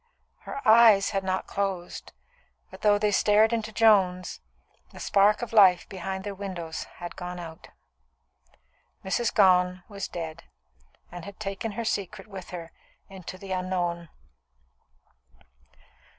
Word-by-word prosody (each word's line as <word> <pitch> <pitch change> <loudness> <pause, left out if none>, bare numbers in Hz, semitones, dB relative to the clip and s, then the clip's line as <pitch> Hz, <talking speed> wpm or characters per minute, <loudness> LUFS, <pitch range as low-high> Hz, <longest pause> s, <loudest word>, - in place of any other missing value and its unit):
Her 275 -3 -5
eyes 220 -3 +6
had 195 -1 -1
not 190 0 -1
closed, 195 -3 -4 0.6
but - - -12
though 205 -1 +4
they 210 0 +1
stared 215 +3 +4
into 220 -1 -2
Joan's, 195 -5 +2 0.5
the - - -12
spark 205 +3 +3
of 230 - -6
life 190 -5 +6
behind 190 0 -5
their 205 0 -5
windows 185 -5 -6
had 175 -1 -8
gone 180 0 -6
out. 165 -2 -10 1.4
Mrs. 230 +4 0
Gone 180 -2 +3
was 200 -2 -6
dead, 165 -1 -7 0.7
and 175 -1 -8
had 200 +2 -10
taken 205 +1 -4
her 230 +2 -4
secret 200 -2 -3
with 195 -4 -10
her 170 -2 -8 0.4
into 185 -1 -9
the 195 0 -10
unknown. 175 -2 -2
195 Hz, 130 wpm, -27 LUFS, 180-210 Hz, 1.4 s, eyes